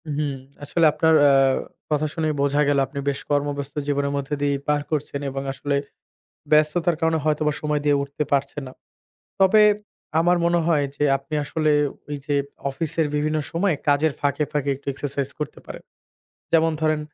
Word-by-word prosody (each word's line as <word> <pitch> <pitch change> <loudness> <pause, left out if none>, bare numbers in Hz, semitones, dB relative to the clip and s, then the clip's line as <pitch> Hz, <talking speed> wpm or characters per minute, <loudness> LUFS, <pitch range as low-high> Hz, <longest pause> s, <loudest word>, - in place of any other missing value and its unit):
হুম। 145 -1 -1 0.3
আসলে 165 +3 +2
আপনার 160 +1 +3 0.2
আ - - +5 0.6
কথা 150 0 +1
শুনেই 155 -2 -1
বোঝা 140 +1 +2
গেল 145 -1 +3
আপনি 140 +2 -6
বেশ 140 - -2
কর্মব্যস্ত 145 -1 -1
জীবনের 140 0 0
মধ্যে 140 +1 -2
দিয়ে 145 -1 +1
পার 150 0 +2
করছেন 145 -2 -2
এবং 135 0 -4
আসলে 140 +1 -2 0.8
ব্যস্ততার 155 +3 +3
কারণে 160 -1 +2
হয়তোবা 150 0 +1
সময় 150 -1 0
দিয়ে 145 -1 +4
উঠতে 140 +2 -3
পারছেন 140 +1 0
না। - - -11 0.7
তবে 195 +3 +6 0.6
আমার 175 +2 +3
মনে 170 0 +3
হয় 150 -4 +3
যে 145 - -1
আপনি 140 +3 -12
আসলে 155 +1 0 0.4
ওইযে 145 0 -3 0.3
অফিসের 160 +2 -1
বিভিন্ন 155 +1 0
সময় 175 0 +1
কাজের 145 +1 +3
ফাঁকে, 145 +1 0
ফাঁকে 145 -2 -1
একটু 140 - -18
এক্সারসাইজ 140 0 -3
করতে 150 - -5
পারেন। - - -9 0.7
যেমন 165 0 +4
ধরেন 155 -1 +1
150 Hz, 160 wpm, -23 LUFS, 140-155 Hz, 0.8 s, তবে